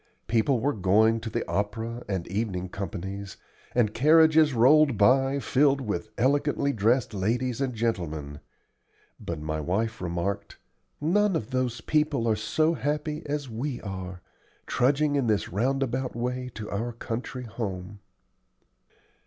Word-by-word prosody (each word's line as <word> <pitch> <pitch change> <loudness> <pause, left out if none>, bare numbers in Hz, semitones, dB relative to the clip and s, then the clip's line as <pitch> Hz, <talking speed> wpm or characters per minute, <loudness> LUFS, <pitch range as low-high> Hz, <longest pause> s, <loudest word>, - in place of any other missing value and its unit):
People 120 +3 +2
were 140 +5 +1
going 110 +4 +3
to 115 - -5
the - - -3
opera 110 +4 -2
and 95 -4 -2
evening 95 -2 -2
companies, 100 0 -6 0.4
and 110 -4 +2
carriages 155 +3 +5
rolled 135 +2 +5
by, 135 +6 +4
filled 140 0 +2
with 110 -3 -3
elegantly 140 +2 +1
dressed 115 +2 +1
ladies 120 +6 -1
and 130 -3 -1
gentlemen; 80 -10 -2 0.8
but 85 -2 -5
my 80 0 -3
wife 105 +8 -1
remarked, 90 +3 -3 0.4
"None 195 +5 +2
of 115 -5 -3
those 125 -2 -1
people 150 -5 +1
are 110 - +3
so 155 +10 +1
happy 150 +1 -2
as 145 -1 -2
we 125 +3 -4
are, 95 -3 -6 0.4
trudging 145 +3 +2
in 135 -4 +1
this 105 -2 +1
roundabout 130 +4 -1
way 125 +1 -3
to 105 -1 -6
our 115 +4 -2
country 120 +2 -5
home." 100 -4 -5
115 Hz, 135 wpm, -27 LUFS, 100-135 Hz, 0.8 s, carriages